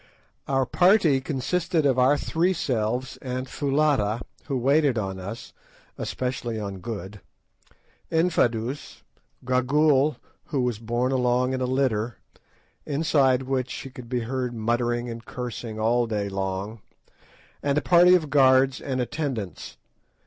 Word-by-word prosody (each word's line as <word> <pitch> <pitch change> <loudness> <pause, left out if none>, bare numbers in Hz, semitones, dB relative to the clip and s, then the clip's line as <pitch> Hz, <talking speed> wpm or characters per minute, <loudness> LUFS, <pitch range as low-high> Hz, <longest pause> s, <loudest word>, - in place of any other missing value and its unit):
Our 135 -1 +1
party 175 - +4
consisted 160 +4 -1
of 130 -2 +3
our 135 +3 +4
three 170 +5 +1
selves 125 -3 -2
and 130 0 -4
Foulata, 135 -7 +1 0.2
who 135 -3 -2
waited 140 +1 +3
on 95 -3 -3
us—especially 115 +3 -6
on 100 -2 -5
Good—Infadoos, 115 - -4 0.4
Gagool, 135 +3 +3 0.3
who 140 - -1
was 120 -4 -1
borne 120 +3 -1
along 125 0 +1
in 130 - -2
a - - +1
litter, 125 -3 0 0.7
inside 140 -4 +2
which 130 -1 -1
she 135 - -7
could 125 -2 -11
be 125 -1 -1
heard 125 +1 -3
muttering 120 +2 0
and 115 -1 -7
cursing 120 -3 -6
all 120 +2 +2
day 105 -2 -2
long, 95 +3 -4 0.8
and 140 0 0
a - - +3
party 180 +1 +6
of 155 -5 -1
guards 130 -1 +4
and 130 -2 -3
attendants. 125 - -4
130 Hz, 125 wpm, -25 LUFS, 115-140 Hz, 0.8 s, party